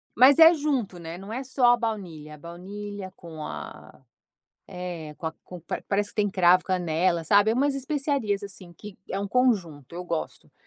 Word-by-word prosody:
Mas 270 +6 +7
é 325 +1 +10
junto, 265 - -1
né, 165 +1 -7
não 195 +3 -9
é 255 +4 -3
só 255 -2 +3
a - - +2
baunilha. 175 -10 -5
A - - -15
baunilha 190 +4 -8
com 160 -3 -9
a - - -9 0.7
é, 175 -4 -6
com - - -9
a 160 - -6
com 180 -1 -10 0.3
parece 205 0 0
que - - -12
tem 205 -1 +2
cravo, 185 -1 +5
canela 175 -1 0
sabe, 205 +5 +4
é - - +1
umas 280 +3 +2
especiarias, 270 -7 -1
assim, 185 -3 -10
que 205 +2 -11
é 195 - -2
um 200 - -3
conjunto, 180 - 0
eu 180 - -5
gosto. 170 -2 -5
195 Hz, 185 wpm, -26 LUFS, 175-235 Hz, 0.7 s, é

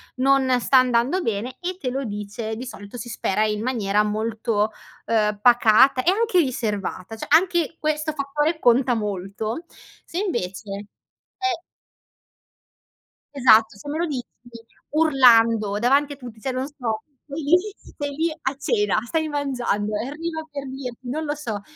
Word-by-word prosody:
non 260 -1 +3
sta 260 +2 +4
andando 255 +7 +3
bene, 230 - -3
e 360 +1 -4
te 255 -6 -2
lo 270 +2 -2
dice, 210 +1 -5
di 245 +4 -6
solito 205 -2 -9
si 240 - -7
spera 215 -2 0
in 210 -1 -1
maniera 210 -4 +1
molto, 215 0 -1 0.3
ehm, 210 -2 +1
pacata 245 +2 +5
e - - +3
anche 435 -2 +2
riservata, 220 - -2
cioè 220 - -7
anche 340 0 +3
questo 310 0 -1
fattore 295 +3 -1
conta 245 0 +4
molto. 210 - -3 0.4
Se 335 - -8
invece 205 - -3 0.5
è 385 -3 -1 1.7
Esatto, 225 -6 +5
se 200 - -12
me 300 - -2
lo 345 - +1
dici 260 -6 -3 0.7
urlando, 230 -9 +4
davanti 275 +6 +2
a - - -9
tutti 245 -5 -11
cioè 265 - -2
non 255 +1 -2
so, 245 -7 -4 0.2
vai 295 +2 -5
lì, 295 +5 +5 0.2
stai 285 -1 -7
lì 325 +2 0
a 265 +1 -1
cena, 415 - +1
stai 315 +5 -1
mangiando, 250 -8 -1
e 220 +4 -3
arriva 315 +2 -5
per 280 -2 -6
dirti 260 -2 -7
non 310 +5 -2
lo 295 0 -2
so, 225 -9 -4
255 Hz, 155 wpm, -23 LUFS, 220-295 Hz, 1.7 s, pacata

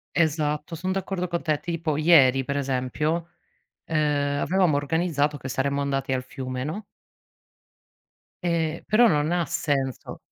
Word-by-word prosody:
Esatto, 155 -1 0
son 185 +3 -3
d'accordo 190 -1 -2
con 170 0 -2
te. 155 -2 0
Tipo 165 -3 -2
ieri, 140 -4 +5
per 140 +2 -3
esempio, 140 +5 -1 0.6
ehm, 145 -2 0
avevamo 180 -3 +2
organizzato 150 0 0
che 130 -1 -7
saremmo 140 +2 0
andati 135 -1 -1
al 130 - -1
fiume, 130 -1 -5
no? 165 +9 -4 1.6
E 165 -2 -1
però 235 +3 +5
non 150 -2 +1
ha 175 -1 +1
senso. 135 -6 -2
150 Hz, 135 wpm, -25 LUFS, 140-170 Hz, 1.6 s, ieri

